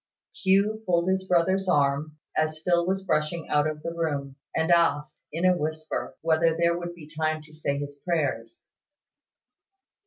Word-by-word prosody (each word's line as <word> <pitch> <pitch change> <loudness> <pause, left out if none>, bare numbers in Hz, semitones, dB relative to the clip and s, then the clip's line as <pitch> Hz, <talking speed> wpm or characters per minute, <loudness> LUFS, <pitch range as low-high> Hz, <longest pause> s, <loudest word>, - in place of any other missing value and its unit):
Hugh 200 +3 +2
pulled 175 0 +2
his 190 0 0
brother's 185 +2 +2
arm, 145 0 +1 0.2
as 155 0 +1
Phil 175 -1 +2
was 190 +1 0
brushing 155 -1 -1
out 150 +1 +3
of 150 -1 -5
the 165 - -3
room, 145 -5 -2 0.2
and 160 +2 +1
asked, 150 -4 +2
in 165 +4 -1
a 180 0 +5
whisper, 155 0 -4
whether 165 0 +2
there 170 0 +3
would 175 0 -5
be 165 -3 -11
time 155 0 -2
to 155 0 -16
say 140 -2 -2
his 145 0 -6
prayers. 140 -9 -2
160 Hz, 160 wpm, -26 LUFS, 150-175 Hz, 0.2 s, a